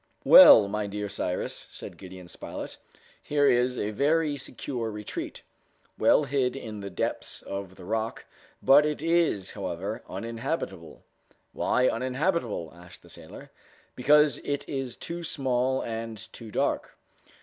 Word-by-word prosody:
"Well, 105 - +10
my 105 +1 -2
dear 105 +1 -4
Cyrus," 90 -3 -3
said - - -8
Gideon 95 -1 -11
Spilett, - - -7 0.4
"here 145 -1 +1
is 125 -1 +3
a 105 - -2
very 150 +6 +1
secure 125 -3 -5
retreat, 105 -1 -6 0.5
well - - +4
hid 135 -2 0
in 110 -6 -7
the 100 0 -6
depths 90 - -3
of 100 -1 -6
the 90 - -12
rock, 110 +3 -3 0.4
but 140 +2 +7
it 150 0 -2
is, 165 - +1
however, - - -4
uninhabitable." 115 - -5 0.5
"Why 125 0 +2
uninhabitable?" 130 - -1
asked 90 0 -14
the - - -17
sailor. - - -12 0.4
"Because 150 +3 +4
it 145 -1 -3
is 135 -3 -4
too 170 +1 -6
small 130 -3 0
and 115 -1 -5 0.2
too 115 -2 -9
dark." - - -1
120 Hz, 135 wpm, -27 LUFS, 105-140 Hz, 0.5 s, Well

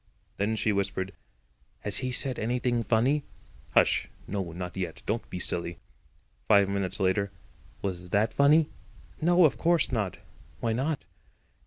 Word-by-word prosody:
Then 105 +3 0
she 110 0 +1
whispered: 95 -1 -2 0.7
"Has 105 - 0
he 130 - 0
said 130 0 +1
anything 120 +1 0
funny?" 125 +6 +2 0.5
"Hush. - - +4 0.2
No, 95 -4 -3
not 90 +1 -6
yet; 90 -4 -4
don't 110 +3 -2
be - - -5
silly." 85 -1 0 0.7
Five 100 -1 +6
minutes 100 0 -2
later: 100 +1 +1 0.5
"Was 90 -2 -4
that 110 +3 +2
funny?" 150 +2 +4 0.5
"No, 175 +2 +5
of 150 - +2
course 170 -3 +3
not." 105 -7 -1 0.4
"Why 115 -1 0
not?" 140 +5 -1
105 Hz, 140 wpm, -28 LUFS, 95-130 Hz, 0.7 s, Five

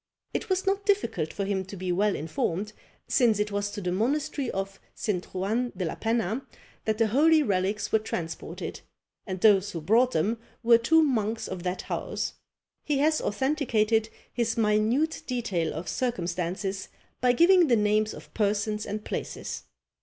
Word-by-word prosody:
It 445 - -3
was 375 0 +1
not 395 +1 +1
difficult 395 - +1
for 200 - -3
him 195 -1 -1
to 195 +2 -9
be 180 0 -2
well 200 +3 +2
informed, 165 +6 -2 0.3
since 235 -6 +3
it 210 0 -1
was 205 0 -1
to 205 0 -6
the 180 -1 -1
monastery 260 +6 0
of 195 0 -4 0.2
St. 185 -5 -1
Juan 220 +7 -1
de 185 - -1
la 160 - -2
Penna 225 +2 -1 0.4
that 220 -1 +1
the 225 - +4
holy 310 +6 +5
relics 195 -1 0
were 220 - +4
transported, 165 -6 -5 0.5
and 185 -1 -3
those 205 -2 +5
who 165 - -3
brought 225 +10 +4
them 215 +9 +1 0.2
were 230 0 +6
two 320 +7 +5
monks 225 -5 0
of 185 -2 -5
that 180 +1 -3
house. - - -3 0.5
He 295 - 0
has 310 +2 +3
authenticated 225 -3 +1 0.2
his 235 -2 0
minute 225 +8 +2
detail 205 -10 -1
of 165 +3 -6
circumstances 185 -2 -2 0.3
by 250 0 +4
giving 345 +4 +6
the 245 - +4
names 215 0 +2
of - - -13
persons 210 0 0
and 210 +1 -4
places. - - -5
215 Hz, 165 wpm, -27 LUFS, 195-245 Hz, 0.5 s, were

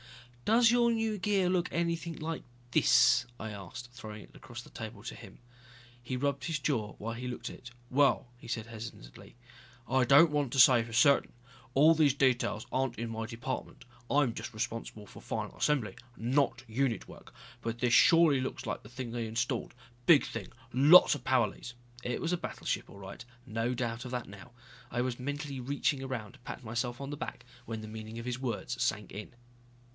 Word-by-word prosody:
"Does 230 +1 +5
your 240 -1 +4
new 225 -2 0
gear 195 -1 +1
look 180 -1 +1
anything 170 -1 -1
like 160 +1 -4 0.3
this?" 120 - +5
I 110 - -5
asked, 105 +5 -8
throwing 110 -4 -9
it - - -19
across - - -9
the - - -16
table - - -8
to - - -6
him. - - -12 0.6
He 125 +1 -4
rubbed 140 +1 -1
his 160 -2 -1
jaw 120 -8 -1
while 115 +2 -4
he 125 +2 -5
looked 125 - -5
at - - -9
it. 120 - -12 0.2
"Well," 140 -1 +3
he - - -13
said 115 -2 -3
hesitatingly, 110 - -10 0.5
"I 130 +1 +3
don't 145 +6 +7
want 145 -4 0
to 135 - 0
say 120 -1 +8
for 115 - -10
certain. 140 +5 +4
After 125 - -23
all 155 +4 +7
these 150 -4 +3
details 125 -5 +1
aren't 130 -2 0
in 115 0 -4
my 115 0 -4
department, 120 +2 -5 0.2
I'm 140 -5 +3
just - - -6
responsible 110 -2 -4
for - - -13
final - - -4
assembly, 140 -8 0 0.2
not 135 +2 +1
unit 115 +1 -1
work. - - -13 0.3
But 115 0 -3
this 120 0 +1
surely 165 -4 +6
looks 130 +1 -4
like 105 - -3
the 105 - -14
thing 120 -1 -6
they 115 -1 -3
installed. 120 +2 -2 0.3
Big 160 -5 +7
thing. 110 -5 -5 0.3
Lots 145 +8 +8
of 145 -4 -5
power 130 -4 +3
leads 120 +3 -9 0.2
" 120 0 -18
It 125 - -2
was 170 +1 -1
a - - +1
battleship - - -3
all 100 - -12
right, 95 0 -9 0.2
no 115 +1 -1
doubt 120 -1 -3
of 125 - -7
that 125 -2 -3
now. 100 +5 -12 0.4
I 120 - -3
was 125 0 -1
mentally 145 +1 -4
reaching 140 +1 0
around 120 -6 -5
to - - -17
pat 125 - -8
myself 120 +2 -3
on 140 +1 -5
the - - -3
back - - -6 0.2
when 110 -1 -5
the 110 - -8
meaning 110 +1 -8
of 115 - -7
his 125 0 -3
words 125 -5 -3
sank 105 +1 -1
in. 105 +4 -8
125 Hz, 200 wpm, -31 LUFS, 115-145 Hz, 0.6 s, say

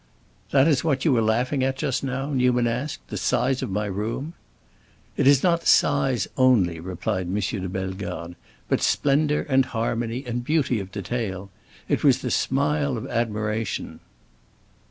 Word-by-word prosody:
"That 135 +1 +4
is 145 -5 +2
what 140 -5 0
you 155 - +4
were 115 - +3
laughing 125 +5 +1
at 135 0 0
just 135 -3 -1
now?" 135 +2 -3
Newman 125 -2 +2
asked; 120 - -3
"the - - -4
size 130 0 +1
of - - -3
my 105 +2 -1
room?" 110 - -4 0.8
"It - - +2
is 140 -1 +5
not 170 -2 +2
size 135 -7 +3
only," 110 -11 +3
replied 95 +2 -3
M. 90 - -2
de 95 -1 -2
Bellegarde, 95 -2 -5 0.3
"but - - +1
splendor, 150 +1 +2
and 135 -2 +4
harmony, 115 +1 -2
and 120 0 -3
beauty 140 -4 +1
of 95 -1 -7
detail. 100 -2 -4 0.4
It - - 0
was - - +4
the - - -2
smile 140 0 +1
of 110 - -5
admiration." 110 -1 -2
120 Hz, 155 wpm, -24 LUFS, 105-135 Hz, 0.8 s, is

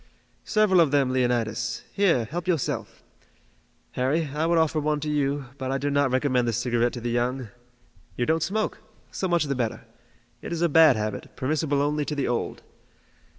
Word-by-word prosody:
"Several 210 -5 +4
of 160 - +4
them, 135 -2 +2
Leonidas. 120 -2 -1
Here, 175 - +2
help 170 +9 -5
yourself. 165 -7 -2 0.9
Harry, 140 +5 0
I 155 +2 0
would 170 0 +2
offer 160 -1 +2
one 150 0 0
to 155 - -3
you, 140 -1 0
but 130 -1 -3
I 135 - 0
do 145 +1 -2
not 145 -1 +2
recommend 130 -1 +1
the 115 - 0
cigarette 120 +1 +1
to 120 - -6
the 120 0 -2
young. 120 0 -1 0.7
You 120 - +1
don't 160 +3 +1
smoke! 210 +7 -1 0.3
So 190 - -2
much 170 -3 +2
the 140 -2 -1
better. 120 -3 -3 0.6
It's 170 -1 -4
a 170 - +3
bad 155 -3 +6
habit, 105 -1 -4
permissible 145 +1 0
only 150 +1 0
to 150 - -3
the 140 - -1
old. 120 -1 -2
140 Hz, 180 wpm, -25 LUFS, 125-160 Hz, 0.9 s, bad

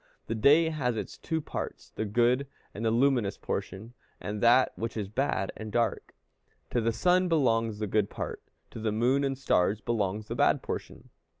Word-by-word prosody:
The - - -3
day 145 +9 +5
has 130 -7 -1
its - - -5
two 160 -1 -3
parts, - - -6
the 110 - -3
good 120 +5 +2 0.3
and 105 - -6
luminous 115 -2 +2
portion, 105 +6 -5 0.3
and 105 0 -5
that 120 +2 +5
which 115 0 -4
is 105 -3 -2
bad 110 -4 -1
and 110 -1 -7
dark. 115 -2 -1 0.6
To 120 - +1
the 115 +1 +1
sun 180 +8 +2
belongs 115 -9 +2
the 105 - -2
good 105 0 +1
part, - - -5 0.3
to - - -8
the 110 0 -1
moon 125 +6 +2
and 135 -1 -1
stars 105 -6 +2
belongs 105 -1 -2
the - - -4
bad - - +2
portion. - - -6
115 Hz, 180 wpm, -29 LUFS, 105-135 Hz, 0.6 s, day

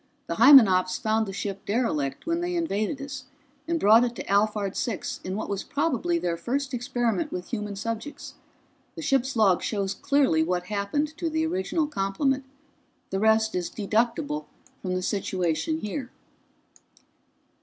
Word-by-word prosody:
The - - -4
Hymenops 195 -10 +7
found 220 0 0
the - - -4
ship 195 0 -5
derelict 155 - -1
when 335 +1 0
they 355 0 -2
invaded 280 - -1
us, 280 -2 -7 0.4
and 335 0 0
brought 220 +1 +6
it 240 -1 -1
to - - -5
Alphard 205 -1 +1
Six 225 -6 -3
in 185 +1 -4
what 215 - -3
was 200 -1 -3
probably 330 +3 0
their 170 - -1
first 265 +9 -2
experiment 245 +4 -1
with 180 0 -5
human 210 -3 -4
subjects. 230 +7 -5 0.6
The 325 - -6
ship's 270 -3 +1
log 200 -5 +4
shows 200 -2 -1
clearly 270 - +2
what 175 +2 0
happened 210 - -2
to 335 -1 -1
the 315 0 0
original 340 -1 0
complement. 270 +2 -1 0.7
The 195 - -1
rest 220 +1 +3
is 180 -1 -2
deducible 240 +8 -1 0.3
from 185 -1 -2
the 185 - -2
situation 190 - -1
here." 250 +5 -4
225 Hz, 155 wpm, -26 LUFS, 195-285 Hz, 0.7 s, Hymenops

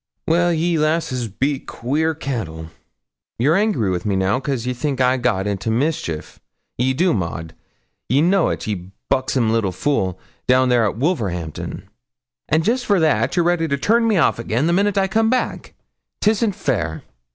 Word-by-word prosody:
'Well, 175 +2 +3
you 165 -1 +1
lasses 155 -6 0
be 135 +7 -1
queer 155 +8 -2
cattle; 80 - -5 0.7
ye're 140 +7 +3
angry 195 - +1
wi' 90 - 0
me 100 -2 0
now, 95 +6 +1
cos 135 -4 -3
ye 125 - -1
think 135 +2 -2
I 130 0 +3
got 115 -6 0
into 100 +1 -2
mischief 115 - -2 0.4
ye 130 +2 +1
do, 175 +5 +2
Maud; 80 -4 -3 0.6
ye 130 +5 +3
know't, 180 +4 +2
ye 95 -4 -4 0.2
buxsom 130 -4 +1
little 110 -4 +1
fool, 95 -3 -1 0.3
down 130 0 +4
there 120 -2 +3
at 105 - -2
Wolverhampton; 100 - -3 0.6
and 160 +2 +2
jest 245 +5 0
for 200 -3 +3
that 150 -8 +2
ye're 175 - +3
ready 175 -2 +2
to 140 -2 0
turn 230 +9 +2
me 215 -3 +2
off 150 - +2
again 115 +4 0
the 170 - +2
minute 200 +2 +2
I 195 0 +3
come 220 +3 +2
back; 255 +1 -2 0.4
'tisn't 215 -1 +1
fair.' 100 - -2
130 Hz, 170 wpm, -20 LUFS, 110-170 Hz, 0.7 s, down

